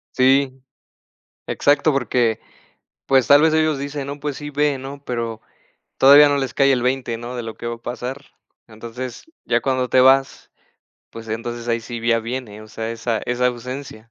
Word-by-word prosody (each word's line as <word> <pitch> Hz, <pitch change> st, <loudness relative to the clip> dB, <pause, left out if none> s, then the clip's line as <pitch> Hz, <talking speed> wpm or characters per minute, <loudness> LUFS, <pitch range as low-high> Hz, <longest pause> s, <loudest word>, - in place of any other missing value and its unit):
Sí. 135 Hz, +1 st, +3 dB, 1.0 s
Exacto, 145 Hz, +2 st, +2 dB
porque 120 Hz, -4 st, 0 dB, 0.7 s
pues 135 Hz, -2 st, +3 dB
tal 145 Hz, 0 st, +7 dB
vez 160 Hz, 0 st, +3 dB
ellos 155 Hz, -2 st, +2 dB
dicen: 140 Hz, 0 st, -5 dB
"No, 140 Hz, +1 st, -6 dB
pues 145 Hz, -1 st, -4 dB
sí, 150 Hz, 0 st, -7 dB
ve", 145 Hz, -1 st, 0 dB
¿no?, 140 Hz, +2 st, -9 dB
pero 115 Hz, -2 st, -4 dB, 0.6 s
todavía 145 Hz, +2 st, +8 dB
no 145 Hz, -, +1 dB
les 135 Hz, -4 st, -3 dB
cae 135 Hz, 0 st, +3 dB
el 125 Hz, -, +1 dB
20 125 Hz, -2 st, -1 dB
¿no?, 120 Hz, +2 st, -7 dB
de 120 Hz, -, -4 dB
lo 115 Hz, -1 st, -7 dB
que 120 Hz, -, -6 dB
va 120 Hz, -, -3 dB
a -, -, -15 dB
pasar. 125 Hz, +4 st, -6 dB, 0.4 s
Entonces 115 Hz, +2 st, -8 dB, 0.2 s
ya 120 Hz, 0 st, +1 dB
cuando 130 Hz, -2 st, 0 dB
te 130 Hz, -, +4 dB
vas, 135 Hz, +1 st, +3 dB, 0.6 s
pues 115 Hz, 0 st, -10 dB
entonces 115 Hz, +2 st, -5 dB
ahí 115 Hz, 0 st, 0 dB
sí 120 Hz, +1 st, -7 dB
ya 115 Hz, -1 st, +3 dB
viene, 115 Hz, -3 st, -6 dB
o 110 Hz, -, -14 dB
sea, 110 Hz, +1 st, -5 dB
esa 115 Hz, -1 st, -2 dB
esa 125 Hz, +1 st, +1 dB
ausencia. 125 Hz, -2 st, -6 dB
125 Hz, 185 wpm, -20 LUFS, 115-140 Hz, 1.0 s, todavía